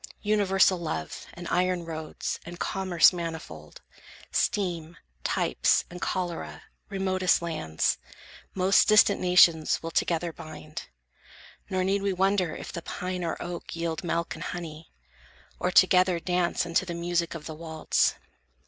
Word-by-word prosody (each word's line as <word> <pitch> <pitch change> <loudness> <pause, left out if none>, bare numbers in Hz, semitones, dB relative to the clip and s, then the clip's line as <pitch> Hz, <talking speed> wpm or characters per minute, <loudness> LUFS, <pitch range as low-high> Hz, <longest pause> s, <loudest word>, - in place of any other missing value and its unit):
Universal 195 -3 +3
love, 80 - -5
And 175 0 -7
iron 180 -1 +1
roads, 160 -1 -5
and 175 0 -9
commerce 185 -3 +4
manifold, 160 - -7 0.5
Steam, 170 -4 -1 0.3
types, - - +2
and 180 - -9
cholera, 175 -3 -3 0.3
remotest 185 -2 +1
lands, 80 - -1 0.6
Most 190 +1 +4
distant 210 -1 +5
nations 175 -4 +4
will 165 - -4
together 170 0 0
bind; 155 +1 -9 0.8
Nor 185 0 0
need 195 +2 +1
we 200 -1 0
wonder 190 -2 +1
if - - -8
the 170 - -4
pine 180 +1 -4
or 165 - -3
oak 175 -1 -6
Yield 165 -1 -3
milk 170 -1 -1
and - - -7
honey, 160 -2 -7 0.7
or 180 - 0
together 185 -1 +5
dance 180 0 0
Unto 170 +1 +1
the 175 -2 -5
music 170 0 -1
of 155 -2 -8
the 160 - -6
waltz. 160 0 0
175 Hz, 135 wpm, -27 LUFS, 165-185 Hz, 0.8 s, distant